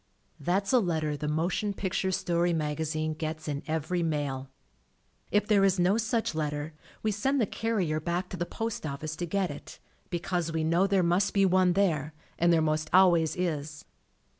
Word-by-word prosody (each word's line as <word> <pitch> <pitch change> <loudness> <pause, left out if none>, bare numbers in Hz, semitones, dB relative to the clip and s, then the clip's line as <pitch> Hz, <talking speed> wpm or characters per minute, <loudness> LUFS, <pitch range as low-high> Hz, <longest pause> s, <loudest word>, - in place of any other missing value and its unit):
That's 195 +5 0
a 250 - +7
letter 160 -7 -1
The 150 +1 -4
Motion 175 +7 -1
Pic 190 -2 -3
ture 190 - 0
Story 175 -2 +1
Magazine 155 0 -1
gets 155 0 -5
in 145 -1 -2
every 160 +3 -1
mail. 145 -5 -2 0.8
If 205 0 +2
there 210 -2 +4
is 195 -1 +3
no 185 +5 +3
such 225 -2 0
letter, 150 0 -3 0.3
we 215 - +1
send 265 +8 0
the 230 - +3
carrier 195 -8 -1
back 175 +3 -2
to 185 - -6
the 175 0 -2
postoffice 155 -9 -4
to 175 - -3
get 190 -1 0
it, 145 - -10 0.3
because 175 -1 -2
we 160 -1 -1
know 170 +4 +3
there 195 -2 +2
must 175 +4 +1
be 195 -1 +5
one 185 -1 +4
there, 160 -6 0 0.2
and 170 +1 +4
there 165 -2 +4
most 155 0 0
always 175 -3 +5
is. 155 -4 -3
170 Hz, 180 wpm, -28 LUFS, 155-190 Hz, 0.8 s, a